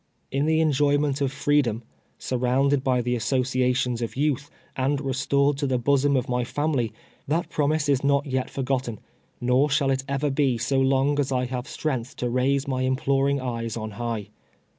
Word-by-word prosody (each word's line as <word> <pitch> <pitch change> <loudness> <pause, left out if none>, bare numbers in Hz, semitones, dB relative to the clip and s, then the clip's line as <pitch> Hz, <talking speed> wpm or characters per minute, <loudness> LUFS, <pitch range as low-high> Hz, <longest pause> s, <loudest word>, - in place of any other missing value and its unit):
In 140 +3 0
the 160 0 +3
enjoyment 145 -1 +2
of 135 -2 +1
'freedom 135 -5 +1 0.2
— - - -40
surrounded 130 +2 +1
by 130 -2 +2
the 125 +1 0
associations 125 -1 0
of 115 - -4
youth, 145 0 0 0.3
and 135 +2 0
restored 140 +1 +1
to 145 - 0
the 130 -1 +1
bosom 140 +3 +2
of 125 - -1
my 125 0 0
family 135 -3 -1 0.2
— - - -30
that 160 +4 -1
prom 150 0 +1
ise 155 -1 0
is 140 -2 +2
not 140 +1 +2
yet 130 -2 -2
forgotten, 130 -4 -2 0.4
noi 125 +4 +3
shall 140 -1 +1
it 135 0 0
ever 140 +1 0
be 135 -3 +1
so 135 +4 0
long 135 +2 +2
as 140 -1 0
I 125 -1 +1
have 125 +1 -4
strength 130 -6 -3
to 120 -1 -2
raise 135 +3 +1
my 130 -2 -1
imploring 135 +2 +1
eyes 115 -3 -3
on 110 -1 -5
high. 115 -1 -4
135 Hz, 185 wpm, -25 LUFS, 125-140 Hz, 0.4 s, the